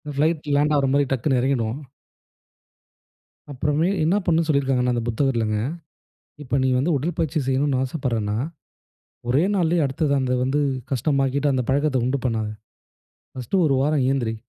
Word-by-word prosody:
Flight 155 +2 +1
land 150 +1 +2
ஆவுறமாரி 140 +1 +2
டக்குன்னு 130 +1 +1
இறங்கிடுவோம். 125 -2 -1 1.7
அப்பறமே 150 +5 0 0.2
என்ன 170 +5 +2
பண்ணணும்ன்னு 165 -2 +1
சொல்லியிருக்காங்கன்னா 135 -4 +1
அந்த 120 - -1
புத்தகத்துலங்க, 115 -4 0 0.9
இப்ப 135 0 -1
நீங்க 130 -1 +2
வந்து 160 +6 +1
உடற்பயிற்சி 160 +1 -2
செய்யணும்ன்னு 135 0 +1
ஆசைப்பட்றேன்னா, 115 -7 -2 0.9
ஒரே 130 +6 +3
நாள்லயே 170 -2 +2
அடுத்தது 140 +2 0
அந்த 130 -1 0
வந்து 135 +3 0 0.3
கஷ்டமாக்கிட்டு, 135 +2 +1
அந்த 130 -1 0
பழக்கத்த 140 0 +1
உண்டு 130 +2 0
பண்ணாத. 110 -3 -1 0.9
ஃபர்ஸ்டு 130 +8 -3
1 140 - +2
வாரம் 145 -1 +1
எழுந்திரி. 120 -5 0
135 Hz, 130 wpm, -23 LUFS, 125-150 Hz, 1.7 s, ஒரே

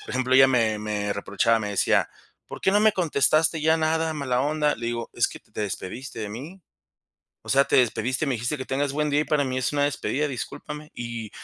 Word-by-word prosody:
Por - - -10
ejemplo, 130 0 0
ella 135 0 +8
me 115 -4 +2
me 105 -1 -2
reprochaba, 100 +3 +1
me 105 -1 -3
decía: 100 - +2 0.4
"¿Por - - -9
qué 190 - +3
no 205 +1 +3
me 215 -1 +5
contestaste 160 -1 +2
ya 160 +1 +3
nada, 160 0 0
mala 130 -4 -1
onda?" 150 +1 +1
Le 115 - -5
digo: 120 0 -3
"Es - - +1
que - - -10
te - - -33
te - - -5
despediste 110 +5 -5
de 105 -1 -4
mí. 160 - -9 0.8
O - - -15
sea, 135 +1 +5
te - - +1
despediste, 130 +3 +1
me 135 - 0
dijiste 120 +6 -2
que 130 - -4
tengas 135 +2 -1
buen 150 +1 0
día, 145 +1 +2
y - - 0
para 150 -2 +1
mí 130 -1 -3
es 130 - -1
una 145 -1 +2
despedida, 145 +1 -1
discúlpame". 150 +3 -7
Y 115 -2 -6
135 Hz, 230 wpm, -25 LUFS, 115-150 Hz, 0.8 s, ella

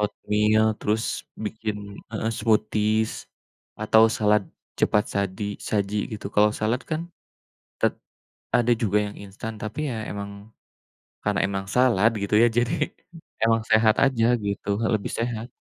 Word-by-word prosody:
Oatmeal 105 +1 +2 0.2
terus 110 +2 0 0.4
bikin 110 0 -3 0.3
heeh, 110 +1 -2
smoothies 110 0 +1 0.7
atau 110 +1 +5 0.2
salad 105 -1 +3 0.4
cepat 105 0 +3
sadi 100 +1 -2 0.2
saji 100 0 0 0.2
gitu. 105 - -5
Kalau 105 +1 +5
salad 115 +4 0
kan 155 0 0 0.8
tet - - +2 0.6
ada 120 0 +3
juga 105 -1 +2
yang 105 - -8
instan 100 +3 -7
tapi 135 +8 -3
ya 110 -2 -4
emang 100 0 -5 0.9
karena 105 -1 +1
emang 95 -1 -3
salad 115 -4 +4
gitu 100 +1 0
ya - - +7
jadi 120 0 +2 0.7
emang 115 0 +3
sehat 110 +1 +5
aja 130 -4 +3 0.2
gitu, 100 0 -3
heeh, 115 - 0
lebih 100 - -4
sehat. 115 0 -3
110 Hz, 135 wpm, -25 LUFS, 105-115 Hz, 0.9 s, ya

